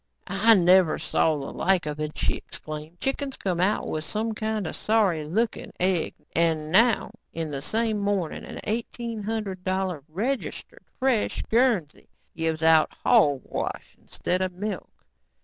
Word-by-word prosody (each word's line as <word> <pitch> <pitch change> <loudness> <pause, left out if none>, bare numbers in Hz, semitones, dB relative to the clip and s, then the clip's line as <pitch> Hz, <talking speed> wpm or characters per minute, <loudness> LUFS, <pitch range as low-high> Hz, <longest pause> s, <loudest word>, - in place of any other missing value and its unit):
"I 220 +4 +5
never 180 -2 +5
saw 155 -2 +1
the 135 -1 -6
like 185 -4 +2
of 150 0 -4
it," 155 0 -4
she - - +1
exclaimed. 155 +3 -8
"Chickens 270 +2 -2
come 180 -3 -1
out 200 +3 +1
with 155 - -2
some 220 +5 -2
kind 215 -2 -2
of - - -4
sorry 205 -8 +2
looking 220 +9 -1
egg 180 -2 +1 0.2
and 160 -2 +1
now, 230 +5 +4 0.2
in 160 -2 -3
the 140 -1 -4
same 220 +5 0
morning, 200 -5 -1
an - - -8
eighteen 230 0 -3
hundred 205 -3 -3
dollar 185 -5 -1
registered, 250 - -4
fresh 255 -5 +1
Guernsey 225 - +1 0.3
gives 160 -1 -1
out 160 -1 +5
hogwash 140 -3 +1
instead 180 +1 -3
of 185 -1 -1
milk." 200 +1 -4
185 Hz, 150 wpm, -26 LUFS, 160-220 Hz, 0.3 s, I